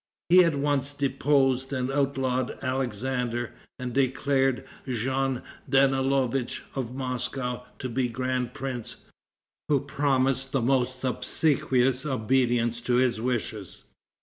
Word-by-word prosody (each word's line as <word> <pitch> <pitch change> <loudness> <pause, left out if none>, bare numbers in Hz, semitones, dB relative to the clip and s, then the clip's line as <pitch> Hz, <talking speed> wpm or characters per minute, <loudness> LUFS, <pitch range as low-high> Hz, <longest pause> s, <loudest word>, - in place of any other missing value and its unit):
He 180 +1 +8
at 165 -3 +2
once 140 0 0
deposed 135 -1 +2
and 130 -1 -1
outlawed 135 -2 0
Alexander, 125 -1 -2 0.2
and 125 -1 -5
declared 135 0 +1 0.2
Jean 130 +1 -1 0.3
Danielovitch, 135 -2 +2
of 125 -2 -4
Moscow, 125 -1 -3
to 130 - -4
be 125 +1 0
grand 125 +1 -2
prince, 130 -4 -5 0.6
who 145 -2 +4
promised 135 -2 +1
the 135 - +2
most 130 0 +1
obsequious 130 -1 +1
obedience 120 -3 +1
to 120 +1 +1
his 125 -3 +2
wishes. 110 -5 -3
130 Hz, 110 wpm, -27 LUFS, 125-135 Hz, 0.6 s, He